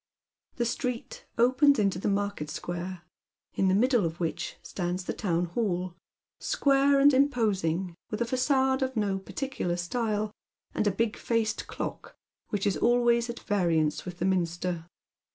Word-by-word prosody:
The 240 Hz, -, 0 dB
street 245 Hz, 0 st, -3 dB
oj^ens 260 Hz, +4 st, +5 dB
into 195 Hz, -4 st, +1 dB
the -, -, -2 dB
market 200 Hz, -6 st, -1 dB
square, 175 Hz, +2 st, -5 dB, 0.5 s
in 195 Hz, -, +1 dB
the 185 Hz, -, +4 dB
middle 245 Hz, +1 st, +3 dB
of 165 Hz, 0 st, -3 dB
which 165 Hz, -2 st, -3 dB
stands 180 Hz, 0 st, -3 dB
the -, -, -2 dB
town 175 Hz, -4 st, 0 dB
hall, 180 Hz, -2 st, -1 dB, 0.5 s
square 275 Hz, 0 st, +3 dB
and 285 Hz, +1 st, +6 dB
imposing, 200 Hz, -, +1 dB, 0.2 s
with 215 Hz, -, -3 dB
a 235 Hz, -, +1 dB
facade 265 Hz, +2 st, +2 dB
of 260 Hz, -2 st, -1 dB
no 200 Hz, -2 st, 0 dB
particular 195 Hz, -4 st, -3 dB
style, 215 Hz, +3 st, -1 dB, 0.4 s
and 215 Hz, -, 0 dB
a -, -, +4 dB
big 225 Hz, +3 st, -1 dB
faced 230 Hz, -2 st, -1 dB
clock -, -, -6 dB, 0.4 s
whieh 205 Hz, -1 st, -1 dB
is 200 Hz, -, +1 dB
always 240 Hz, 0 st, +3 dB
at 235 Hz, -, -6 dB
variance 165 Hz, -7 st, +1 dB
with 180 Hz, -1 st, -7 dB
the 175 Hz, -, -1 dB
nn'nster. 175 Hz, -2 st, -1 dB
205 Hz, 150 wpm, -28 LUFS, 180-245 Hz, 0.5 s, and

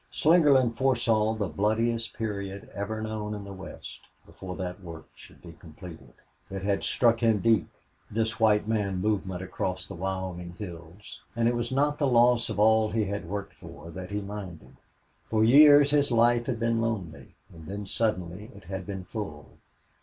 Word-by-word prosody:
Slingerland 145 Hz, -7 st, +4 dB
foresaw 115 Hz, -4 st, +2 dB
the 105 Hz, -3 st, -2 dB
bloodiest 115 Hz, +6 st, -1 dB
period 100 Hz, -3 st, -5 dB
ever 110 Hz, +2 st, -4 dB
known 105 Hz, -1 st, -4 dB
in 105 Hz, -, -7 dB
the 100 Hz, 0 st, -8 dB
West, 95 Hz, 0 st, -10 dB, 0.2 s
before 90 Hz, -1 st, -9 dB
that 90 Hz, 0 st, -5 dB
work 85 Hz, -3 st, -10 dB
should -, -, -16 dB
be 85 Hz, -2 st, -11 dB
completed. 80 Hz, -5 st, -13 dB, 0.3 s
It 95 Hz, -1 st, -6 dB
had 100 Hz, 0 st, 0 dB
struck 115 Hz, -2 st, +2 dB
him 115 Hz, -2 st, +3 dB
deep 105 Hz, -4 st, +2 dB, 0.4 s
this 110 Hz, +1 st, -1 dB
white 105 Hz, -1 st, +3 dB
man 105 Hz, -4 st, 0 dB
movement 95 Hz, -2 st, -1 dB
across 95 Hz, -1 st, -3 dB
the -, -, -9 dB
Wyoming 90 Hz, -1 st, -4 dB
hills, 85 Hz, 0 st, -10 dB
and 115 Hz, 0 st, +2 dB
it 120 Hz, -, +2 dB
was 120 Hz, 0 st, -2 dB
not 145 Hz, +2 st, +1 dB
the 145 Hz, -, +2 dB
loss 120 Hz, -1 st, +4 dB
of -, -, -4 dB
all 110 Hz, 0 st, +4 dB
he 110 Hz, -1 st, 0 dB
had 100 Hz, -4 st, -5 dB
worked 100 Hz, 0 st, -5 dB
for 80 Hz, +3 st, -12 dB
that 90 Hz, +2 st, -8 dB
he 105 Hz, 0 st, -3 dB
minded. 100 Hz, -5 st, -8 dB, 0.5 s
For 110 Hz, -1 st, +2 dB
years 145 Hz, +4 st, +7 dB
his 145 Hz, -2 st, +2 dB
life 120 Hz, 0 st, +3 dB
had 120 Hz, -4 st, -2 dB
been 115 Hz, -1 st, +1 dB
lonely, 105 Hz, -9 st, -4 dB, 0.2 s
and 80 Hz, -2 st, -12 dB
then 100 Hz, +2 st, -5 dB
suddenly 100 Hz, -1 st, -2 dB
it 100 Hz, -, -13 dB
had 95 Hz, +1 st, -6 dB
been 95 Hz, -2 st, -5 dB
full. 75 Hz, -, -7 dB
105 Hz, 175 wpm, -27 LUFS, 95-115 Hz, 0.5 s, years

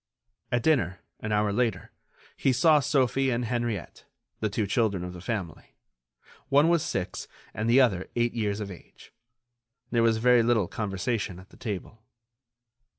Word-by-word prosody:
At 120 Hz, -2 st, +1 dB
dinner, 120 Hz, -, +1 dB, 0.2 s
an 110 Hz, -, -4 dB
hour 105 Hz, -1 st, +1 dB
later, 115 Hz, -4 st, -1 dB, 0.4 s
he 135 Hz, -, +2 dB
saw 150 Hz, +5 st, +5 dB
Sophie 135 Hz, -1 st, +1 dB
and 120 Hz, -1 st, 0 dB
Henriette, 115 Hz, -4 st, -3 dB, 0.4 s
the 110 Hz, -, 0 dB
two 105 Hz, +1 st, -1 dB
children 100 Hz, -3 st, 0 dB
of 90 Hz, 0 st, -6 dB
the 90 Hz, -, -9 dB
family, 95 Hz, -6 st, -5 dB, 0.7 s
one 145 Hz, +3 st, +5 dB
was 170 Hz, -2 st, +3 dB
six 95 Hz, -, -3 dB, 0.3 s
and 110 Hz, +3 st, -2 dB
the 125 Hz, +3 st, +6 dB
other 95 Hz, -8 st, +1 dB
eight 120 Hz, 0 st, +1 dB
years 105 Hz, -3 st, -1 dB
of 100 Hz, -2 st, -5 dB
age. 90 Hz, -, -15 dB, 0.8 s
There 115 Hz, -, +2 dB
was 115 Hz, -1 st, +3 dB
very 125 Hz, +1 st, +5 dB
little 115 Hz, -5 st, +2 dB
conversation 100 Hz, -1 st, -3 dB
at 95 Hz, +1 st, -14 dB
the -, -, -16 dB
table. 110 Hz, 0 st, -6 dB
115 Hz, 155 wpm, -27 LUFS, 100-125 Hz, 0.8 s, the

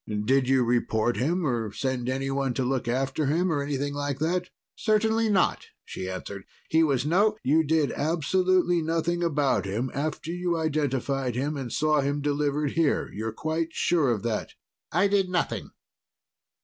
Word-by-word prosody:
Did 130 Hz, +1 st, +2 dB
you 135 Hz, -1 st, +4 dB
report 120 Hz, -1 st, +1 dB
him 165 Hz, +7 st, 0 dB
or 115 Hz, -6 st, -1 dB
send 125 Hz, +2 st, -2 dB
anyone 135 Hz, -1 st, -1 dB
to 130 Hz, -, 0 dB
look 130 Hz, -1 st, -1 dB
after 135 Hz, +4 st, 0 dB
him 170 Hz, +5 st, +1 dB
or 145 Hz, -3 st, 0 dB
anything 140 Hz, 0 st, -2 dB
like 145 Hz, -1 st, -2 dB
that?" 175 Hz, +4 st, -1 dB, 0.3 s
"Certainly 220 Hz, +1 st, +2 dB
not," 195 Hz, -3 st, +1 dB, 0.2 s
she 95 Hz, -, -6 dB
answered. 95 Hz, +1 st, -6 dB, 0.3 s
"He 160 Hz, -, +4 dB
was 140 Hz, -4 st, +2 dB
no 205 Hz, +7 st, +3 dB
" -, -, -54 dB
"You 155 Hz, +4 st, +3 dB
did 155 Hz, -1 st, +1 dB
absolutely 175 Hz, +3 st, +1 dB
nothing 165 Hz, +2 st, -1 dB
about 145 Hz, -9 st, +1 dB
him 115 Hz, +7 st, -2 dB
after 155 Hz, +3 st, -3 dB
you 175 Hz, -1 st, -1 dB
identified 135 Hz, -5 st, -1 dB
him 145 Hz, +4 st, -1 dB
and 130 Hz, -4 st, -5 dB
saw 155 Hz, -1 st, +2 dB
him 140 Hz, +1 st, -1 dB
delivered 145 Hz, 0 st, 0 dB
here? 165 Hz, -3 st, +1 dB
You're 110 Hz, +2 st, -3 dB
quite 160 Hz, +7 st, -2 dB
sure 160 Hz, -6 st, +2 dB
of 115 Hz, -3 st, -1 dB
that?" 115 Hz, -2 st, -3 dB, 0.4 s
"I 180 Hz, +5 st, +3 dB
did 195 Hz, -2 st, +1 dB
nothing." 180 Hz, -2 st, -1 dB
145 Hz, 165 wpm, -26 LUFS, 130-165 Hz, 0.4 s, you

